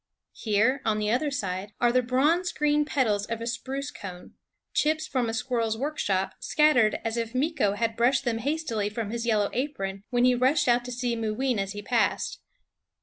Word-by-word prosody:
Here, 225 +5 +1
on 215 -1 +1
the 210 0 0
other 270 +5 +1
side, 200 -6 -4
are 240 -1 +4
the 255 +1 +3
bronze 295 +9 +2
green 295 0 +2
petals 215 -9 0
of 230 -1 -3
a 230 - -5
spruce 270 +4 -4
cone, 180 -7 -9 0.4
chips 310 +1 +1
from 255 -6 -1
a - - -3
squir 245 0 -1
rel's 220 -1 0
workshop, 215 -9 -1
scattered 255 -8 +3
as 225 +1 -1
if 230 0 -3
Meeko 265 -7 +1
had 225 +1 -1
brushed 255 +4 +2
them 230 -2 0
hastily 245 -6 -1
from 215 -1 -4
his 235 0 -3
yellow 210 -3 +2
apron 200 -8 -3
when 245 -1 +2
he 250 - +5
rushed 255 +5 +2
out 240 0 +3
to 250 - -5
see 245 -1 -1
Mooween 225 +2 -1
as 195 +1 -2
he 205 0 -7
passed. 235 +1 0
240 Hz, 195 wpm, -27 LUFS, 215-270 Hz, 0.4 s, he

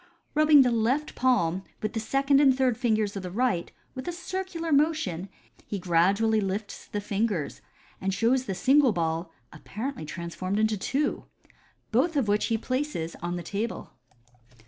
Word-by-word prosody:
Rubbing 300 -2 +7
the 250 - +2
left 240 +7 0
palm 190 -9 +1 0.2
with 215 - -2
the 225 - -1
second 275 +5 +2
and 265 -3 +5
third 260 -3 +2
fingers 215 -4 0
of 195 - -3
the 180 - -5
right, 195 -3 0 0.2
with 260 0 -7
a - - 0
circular 355 -1 -4
motion, 280 - +1 0.4
he 205 - -3
gradually 195 +5 +2
lifts 200 +2 -4
the 205 - -3
fingers, 205 -5 -2 0.4
and 195 - 0
shows 245 +6 +2
the 195 - -3
single 265 +5 +4
ball 165 0 -2 0.2
apparently 220 - -6
transformed 185 +4 -4
into 215 0 +2
two, 275 +9 -1 0.7
both 335 -2 +2
of 260 -6 +1
which 205 +1 +2
he 225 - +1
places 255 - -3
on 175 +1 -2
the 175 - -5
table. 210 +6 -4
220 Hz, 160 wpm, -27 LUFS, 190-270 Hz, 0.7 s, Rubbing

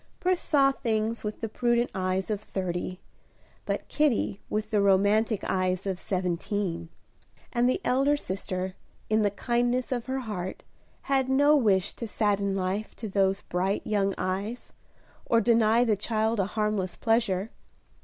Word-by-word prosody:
Pris 365 0 +1
saw 275 -3 +4
things 225 -3 -1
with 210 0 -5
the 225 - -1
prudent 240 +2 +1
eyes 185 +2 -1
of 210 -1 -2
thirty, 185 -2 -4 0.7
but - - -2
Kitty 275 -9 +1
with 215 0 -2
the 210 -2 +3
romantic 200 +2 +3
eyes 185 0 0
of 190 -2 -2
seventeen; 180 -2 -2 0.6
and 245 0 +3
the 255 - +1
elder 275 +3 +3
sister, 185 -4 -3 0.4
in 215 0 +4
the 205 - +3
kindness 245 +4 0
of 245 -1 -2
her 265 0 -2
heart, 190 -6 -5 0.4
had 270 -1 +1
no 285 +3 +5
wish 205 -9 +2
to 230 - -6
sadden 200 -2 0
life 195 +3 -2
to 220 - -6
those 195 0 +1
bright 190 +3 -1
young 200 -2 +1
eyes, 200 +6 -3 0.5
or 230 - +4
deny 230 0 +4
the 225 -3 +2
child 220 +2 0
a 195 - +2
harmless 210 -3 -1
pleasure. 225 -3 +1
210 Hz, 150 wpm, -27 LUFS, 190-235 Hz, 0.7 s, no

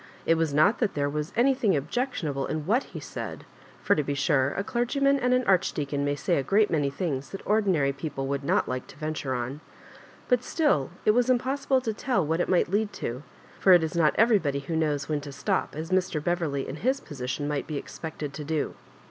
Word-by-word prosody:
It 165 - +4
was 165 -2 +1
not 155 +11 +4
that 220 -5 0
there 145 -1 +1
was 150 +1 -3
anything 245 - +3
objectionable 155 - -2
in 155 -1 -3
what 235 - +2
he - - -8
said - - -7 0.2
— - - -24
for, - - +4
to 150 - +1
be 145 0 -2
sure, 140 -2 +2
a 195 - 0
clergyman 275 +5 +1
and 250 -1 +1
an 255 0 +3
archdeacon 150 - +1
may 145 0 0
say 145 - 0
a - - +2
great 205 +9 +3
many 145 -4 +1
things 140 -3 -3
that 195 - -8
ordinary 190 -10 +2
people 140 -1 -4
would 140 +1 -2
not - - +1
like 125 0 -4
to - - -14
venture 155 -4 -3
on,— 125 +5 -4 0.7
^but 250 -2 +3
still 255 - +1 0.2
it - - +6
was 245 +3 +2
impossible 260 +1 +1
to 225 -3 -2
tell 210 - 0
what 160 +3 0
it - - 0
might 180 -1 +2
lead 210 +1 +1
to; 120 +3 -4 0.4
for 190 - +6
it 175 -2 +6
is 160 +1 -3
not 160 -3 +3
everybody 195 - +3
who 160 +4 -4
knows 150 -3 0
when 150 -2 -1
to 140 0 -8
stop, 135 - -1
as 160 +3 -5
Mr. 180 -5 +1
Beverley 165 -6 -1
in 135 - -5
his 260 - +1
position 135 - -4
might 145 -2 -2
be 150 - -3
expected 150 -1 -6
to 150 - -6
do. 155 0 -2
160 Hz, 220 wpm, -27 LUFS, 140-215 Hz, 0.7 s, it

